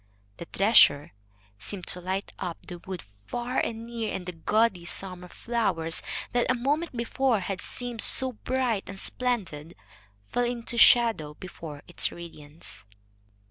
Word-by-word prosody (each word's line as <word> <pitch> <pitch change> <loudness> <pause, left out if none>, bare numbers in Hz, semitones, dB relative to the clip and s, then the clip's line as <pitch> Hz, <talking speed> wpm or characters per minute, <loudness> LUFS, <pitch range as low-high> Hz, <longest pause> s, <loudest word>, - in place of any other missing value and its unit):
The - - -7
treasure 195 -8 +5 0.5
seemed 180 - -6
to 180 - -1
light 190 +2 -3
up 175 -3 -5
the 175 -1 -8
wood 185 0 -7 0.2
far 240 - -1
and 225 0 -2
near, 230 -2 -3
and 180 - -4
the 180 - -3
gaudy 195 +2 +1
summer 180 0 -3
flowers, 180 -7 0 0.3
that 245 0 +1
a 255 - +4
moment 285 +3 -1
before 235 -1 +1
had 190 +1 -4
seemed 245 -2 -4
so 260 -1 +5
bright 250 -3 -1
and 195 - -7
splendid, 185 -13 -3 0.5
fell 245 - 0
into 240 0 -3
shadow 230 -11 +5
before 160 -5 -9
its 175 - +1
radiance. 155 - -11
200 Hz, 140 wpm, -27 LUFS, 175-240 Hz, 0.5 s, treasure